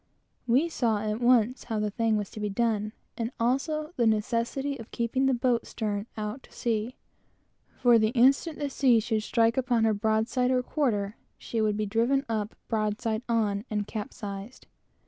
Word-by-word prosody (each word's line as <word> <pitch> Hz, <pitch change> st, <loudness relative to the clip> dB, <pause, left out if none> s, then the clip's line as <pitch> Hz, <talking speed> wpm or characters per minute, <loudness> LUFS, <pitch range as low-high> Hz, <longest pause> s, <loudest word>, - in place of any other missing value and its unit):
We 260 Hz, +8 st, +3 dB
saw, 235 Hz, -9 st, 0 dB
at 215 Hz, +2 st, -2 dB
once, 245 Hz, 0 st, +3 dB
how 225 Hz, -2 st, -2 dB
it 220 Hz, +2 st, 0 dB
was 205 Hz, -2 st, -2 dB
to -, -, -8 dB
be 210 Hz, 0 st, -1 dB
done, 215 Hz, 0 st, 0 dB, 0.3 s
and 230 Hz, +1 st, -1 dB
also 305 Hz, +7 st, 0 dB
the 235 Hz, -2 st, +3 dB
necessity 230 Hz, +6 st, 0 dB
of 225 Hz, -, -9 dB
keeping 250 Hz, +3 st, 0 dB
the 265 Hz, -, +3 dB
boat 240 Hz, -1 st, +1 dB
"stern 205 Hz, -1 st, -3 dB
on" 210 Hz, +4 st, -3 dB
to -, -, -20 dB
the -, -, -19 dB
sea; 230 Hz, +1 st, -1 dB, 0.8 s
for 240 Hz, -2 st, +5 dB
the 215 Hz, 0 st, +3 dB
instant 275 Hz, +6 st, +3 dB
the 290 Hz, -2 st, -3 dB
sea 255 Hz, -4 st, +4 dB
should 220 Hz, 0 st, -1 dB
strike 230 Hz, +2 st, +2 dB
upon 245 Hz, -3 st, +2 dB
her 220 Hz, -1 st, +3 dB
broad 220 Hz, +1 st, +1 dB
side 250 Hz, 0 st, +1 dB
or 255 Hz, -1 st, +2 dB
quarter, 215 Hz, -8 st, -1 dB, 0.2 s
she 230 Hz, -, -3 dB
would 210 Hz, -1 st, +1 dB
be 215 Hz, -, 0 dB
driven 235 Hz, +7 st, +1 dB
up 215 Hz, -2 st, -2 dB
broad 215 Hz, -1 st, -1 dB
side 220 Hz, -1 st, -1 dB
on, 210 Hz, -3 st, +1 dB
and 210 Hz, -1 st, -1 dB
capsized. 210 Hz, 0 st, -7 dB
230 Hz, 185 wpm, -28 LUFS, 215-250 Hz, 0.8 s, for